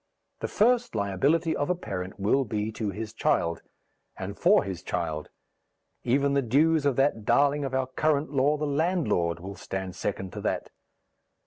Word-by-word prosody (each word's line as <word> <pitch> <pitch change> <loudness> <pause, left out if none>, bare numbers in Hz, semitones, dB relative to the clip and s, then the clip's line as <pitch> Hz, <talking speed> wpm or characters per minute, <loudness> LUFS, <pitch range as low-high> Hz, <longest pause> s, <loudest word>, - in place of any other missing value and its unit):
The - - -2
first 240 - +2
liability 140 - +1
of 145 - -1
a 180 - +2
parent 95 - -6
will 110 +8 +2
be 105 -2 -2
to 110 -1 -3
his 110 +2 -5
child, 85 -6 0 0.6
and 95 +2 -5
for 200 +4 +4
his 95 -3 -5
child; 80 -4 -3 0.7
even 140 +3 +2
the 140 - +3
dues 145 +5 +3
of 140 - +2
that 135 -5 +1
darling 140 +6 +3
of 135 -1 -3
our 130 0 +1
current 150 +3 0
law, 145 +2 +2
the 150 - -2
landlord, 140 - 0
will 95 +3 -7
stand 95 +1 -5
second 95 -1 -4
to - - -6
that. - - -2
130 Hz, 165 wpm, -27 LUFS, 95-145 Hz, 0.7 s, for